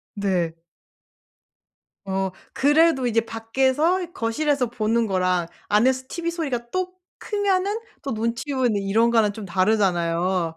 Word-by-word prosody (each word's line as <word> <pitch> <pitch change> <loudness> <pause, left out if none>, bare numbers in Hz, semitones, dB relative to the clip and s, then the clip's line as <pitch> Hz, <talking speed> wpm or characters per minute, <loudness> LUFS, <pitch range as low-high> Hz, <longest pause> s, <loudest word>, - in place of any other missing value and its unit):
네. 185 -5 0 1.5
어 190 0 -1 0.2
그래도 295 -2 +4
이제 230 -1 +2
밖에서 265 +11 0
거실에서 260 +4 0
보는 230 0 +1
거랑 185 -3 +1 0.2
안에서 255 +5 +3
TV 340 +2 -3
소리가 270 -9 -3
또 370 +3 -2 0.3
크면은 405 0 0 0.2
또 275 - -3
눈치 230 +6 -2
보이는 245 -6 +1
이런 220 +4 +2
거랑 225 -3 +3
좀 215 0 -8
다르잖아요. 180 -3 +1
230 Hz, 260 characters per minute, -23 LUFS, 195-285 Hz, 1.5 s, 그래도